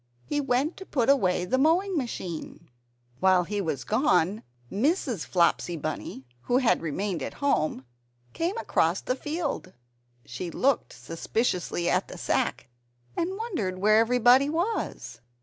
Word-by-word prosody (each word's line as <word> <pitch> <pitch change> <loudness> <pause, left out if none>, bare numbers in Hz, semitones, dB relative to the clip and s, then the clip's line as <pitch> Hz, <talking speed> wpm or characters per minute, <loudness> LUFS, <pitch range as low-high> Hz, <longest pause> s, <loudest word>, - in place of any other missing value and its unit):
He 290 0 -1
went 275 +4 0
to 385 - -9
put 255 -3 +1
away 180 -9 +2
the 260 +8 +1
mowing 355 +7 +3
machine. 175 - -5 0.5
While 185 -1 +4
he 205 +3 -2
was 145 -8 -2
gone, 185 - +2 0.3
Mrs. 250 - 0
Flopsy 175 -1 +2
Bunny 150 -3 -5 0.2
(who 245 - +2
had 255 -3 +3
remained 170 +2 -2
at - - -5
home) 155 - 0 0.5
came 350 +7 -1
across - - +1
the 255 - -1
field. 295 - -4 0.5
She 150 +9 -5
looked 260 +8 +1
suspiciously 175 0 -2
at - - +1
the - - -9
sack - - -1 0.5
and 370 +3 -2
wondered 335 - -3
where 215 +3 +4
everybody 245 +4 +5
was? 320 - -3
225 Hz, 135 wpm, -27 LUFS, 175-285 Hz, 0.5 s, everybody